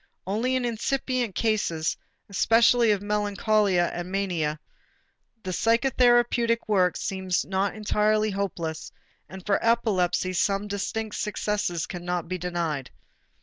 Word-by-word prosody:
Only 225 +7 0
in 255 -1 0
incipient 240 -1 -1
cases, 205 -8 0 0.3
especially 230 +3 +4
of 205 -2 +1
melancholia 205 -3 +1
and 175 +1 -5
mania, 170 -6 -1 0.8
the 185 - -4
psychotherapeutic 240 +1 +2
work 185 -4 +2
seems 190 -2 -2
not 195 +2 -1
entirely 215 0 +1
hopeless; 175 -5 -4 0.4
and 190 -1 -10
for 200 -1 +1
epilepsy 190 -6 +1
some 195 +3 0
distinct 210 +2 -3
successes 205 -5 -2
cannot 175 -1 -4
be 185 +1 -4
denied. 170 -6 -3
200 Hz, 110 wpm, -26 LUFS, 180-225 Hz, 0.8 s, especially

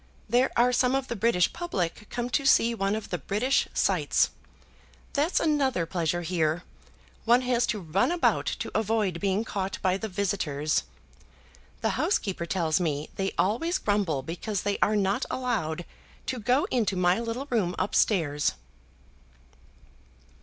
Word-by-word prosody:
There 245 +4 +3
are 245 +1 +4
some 250 +1 +3
of 270 -1 -2
the 235 - -2
British 200 -5 +2
public 210 - -3
come 240 0 -3
to 275 - +1
see 235 -3 +4
one 195 -2 0
of 220 - -6
the 180 - -1
British 215 - +1
sights. - - +2 0.8
That's 300 +5 +2
another 275 - +1
pleasure 175 0 -1
here. 165 -1 0 0.6
One 240 +2 +5
has 245 -1 +1
to 215 - -1
run 180 - +1
about 350 -1 +1
to - - -3
avoid 215 -5 0
being 200 +3 0
caught 195 -3 -3
by 185 0 +2
the 220 - -4
visitors. 180 -7 -1 1.0
The - - 0
housekeeper 180 -3 0
tells 165 -3 +1
me 150 -4 -2
they 195 0 -1
always 285 - +1
grumble 195 -10 0
because 180 - -3
they 205 0 -1
are 215 - +3
not 200 +4 +1
allowed 185 -10 -2 0.4
to 255 - -3
go 250 +6 +2
into 215 -6 +1
my 180 +2 +3
little 235 +3 -3
room 185 -7 +1
up 185 - -1
stairs." 150 -8 +2
200 Hz, 150 wpm, -27 LUFS, 175-240 Hz, 1.0 s, One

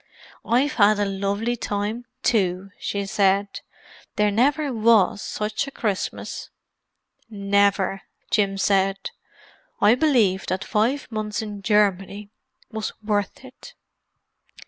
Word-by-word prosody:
"I've 260 +5 +1
had 210 +1 +6
a 205 - +1
lovely 200 +4 -1
time, 215 +2 -3 0.2
too!" 195 -4 +1
she 200 -1 -3
said. 200 0 +1 0.5
"There 210 0 +2
never 280 +6 +1
was 220 -3 +3
such 215 +5 -3
a - - -4
Christmas!" 210 -7 -4 0.8
"Never!" 200 -2 +1 0.3
Jim 200 -2 +1
said. 195 0 +1 0.7
"I 210 +2 +6
believe 240 - +2
that 185 +1 -2
five 240 +6 0
months 215 -1 -3
in 205 -2 -7
Germany 205 -1 +1 0.4
was 220 -1 -4
worth 205 +3 -2
it." 260 - -14
205 Hz, 110 wpm, -23 LUFS, 195-225 Hz, 0.8 s, had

